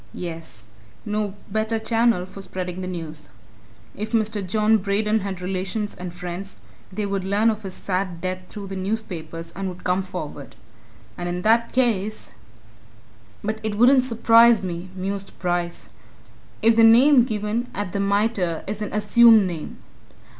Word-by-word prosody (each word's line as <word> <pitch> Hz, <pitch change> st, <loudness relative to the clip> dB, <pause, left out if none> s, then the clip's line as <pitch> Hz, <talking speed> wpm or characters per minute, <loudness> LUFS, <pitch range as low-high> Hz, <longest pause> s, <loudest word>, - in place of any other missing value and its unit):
yes, 165 Hz, -10 st, -6 dB, 0.4 s
no 210 Hz, -2 st, -2 dB
better 220 Hz, +2 st, -1 dB
channel 225 Hz, -4 st, +1 dB
for 195 Hz, +1 st, -11 dB
spreading 185 Hz, -1 st, -5 dB
the 185 Hz, -, -4 dB
news. 160 Hz, -4 st, -6 dB, 0.7 s
If 215 Hz, +3 st, -5 dB
Mr. 215 Hz, -2 st, +1 dB
John 215 Hz, +3 st, +2 dB
Braden 210 Hz, +2 st, +1 dB
had 190 Hz, -2 st, -5 dB
relations 195 Hz, +3 st, -3 dB
and 180 Hz, -1 st, -7 dB
friends, 180 Hz, +2 st, -7 dB, 0.3 s
they 210 Hz, +2 st, -2 dB
would 195 Hz, -1 st, -2 dB
learn 205 Hz, +4 st, +2 dB
of 215 Hz, 0 st, -5 dB
his 190 Hz, -3 st, -6 dB
sad 185 Hz, -2 st, -2 dB
death 185 Hz, +1 st, -3 dB
through 205 Hz, -2 st, -7 dB
the 195 Hz, -, -5 dB
newspapers, 185 Hz, -5 st, -4 dB
and 195 Hz, +1 st, -3 dB
would 180 Hz, 0 st, -10 dB
come 180 Hz, +1 st, +1 dB
forward. 170 Hz, -7 st, -7 dB, 0.6 s
And 175 Hz, 0 st, -3 dB
in 180 Hz, +1 st, -3 dB
that 230 Hz, +2 st, +3 dB
case 215 Hz, -5 st, 0 dB, 1.1 s
"But 215 Hz, +1 st, -2 dB
it 215 Hz, -1 st, -2 dB
wouldn't 255 Hz, +3 st, +6 dB
surprise 230 Hz, -2 st, +5 dB
me," 175 Hz, 0 st, -5 dB
mused 195 Hz, +1 st, -4 dB
Bryce, 175 Hz, -1 st, -2 dB, 0.7 s
"if 225 Hz, 0 st, +5 dB
the 225 Hz, -, +5 dB
name 245 Hz, +4 st, +7 dB
given 220 Hz, +1 st, -2 dB
at 205 Hz, -2 st, -3 dB
the 200 Hz, -, -2 dB
Mitre 200 Hz, -4 st, 0 dB
is 205 Hz, +2 st, -5 dB
an 210 Hz, -, -3 dB
assumed 215 Hz, 0 st, +6 dB
name. 170 Hz, -4 st, -5 dB
200 Hz, 155 wpm, -23 LUFS, 180-220 Hz, 1.1 s, name